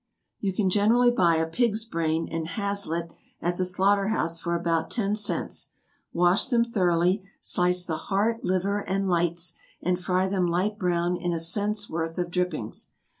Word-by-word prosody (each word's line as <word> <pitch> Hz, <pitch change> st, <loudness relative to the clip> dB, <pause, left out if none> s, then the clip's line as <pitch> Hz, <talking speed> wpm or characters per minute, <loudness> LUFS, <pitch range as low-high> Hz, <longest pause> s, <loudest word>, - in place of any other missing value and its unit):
= -, -, -54 dB
You 200 Hz, -, -1 dB
can 190 Hz, 0 st, 0 dB
generally 230 Hz, +5 st, +4 dB
buy 175 Hz, -8 st, +3 dB
a 160 Hz, 0 st, +1 dB
pig's 220 Hz, +5 st, 0 dB
brain 165 Hz, -5 st, -1 dB
and 165 Hz, -1 st, -3 dB
haslet 190 Hz, -4 st, -2 dB, 0.3 s
at 175 Hz, +1 st, -2 dB
the 185 Hz, -, +1 dB
slaughter 195 Hz, +2 st, +2 dB
house 170 Hz, -6 st, -1 dB
for 170 Hz, 0 st, -2 dB
about 170 Hz, -1 st, 0 dB
ten 210 Hz, -3 st, 0 dB
cents; 210 Hz, 0 st, 0 dB, 0.4 s
wash 175 Hz, +6 st, +3 dB
them 235 Hz, -3 st, +2 dB
thoroughly; 180 Hz, -3 st, +1 dB, 0.2 s
slice 180 Hz, 0 st, +2 dB
the 160 Hz, -3 st, -3 dB
heart, 220 Hz, +4 st, +1 dB
liver, 190 Hz, +3 st, 0 dB
and 195 Hz, 0 st, -2 dB
lights, 170 Hz, -1 st, 0 dB, 0.3 s
and 180 Hz, 0 st, 0 dB
fry 185 Hz, +1 st, +1 dB
them 190 Hz, -2 st, 0 dB
light 190 Hz, +5 st, -1 dB
brown 175 Hz, -1 st, 0 dB
in 175 Hz, 0 st, -2 dB
a 165 Hz, -, -1 dB
cents' 205 Hz, +5 st, +1 dB
worth 165 Hz, +1 st, -4 dB
of 175 Hz, -1 st, -2 dB
drippings. 175 Hz, -11 st, -2 dB
180 Hz, 175 wpm, -26 LUFS, 170-205 Hz, 0.4 s, generally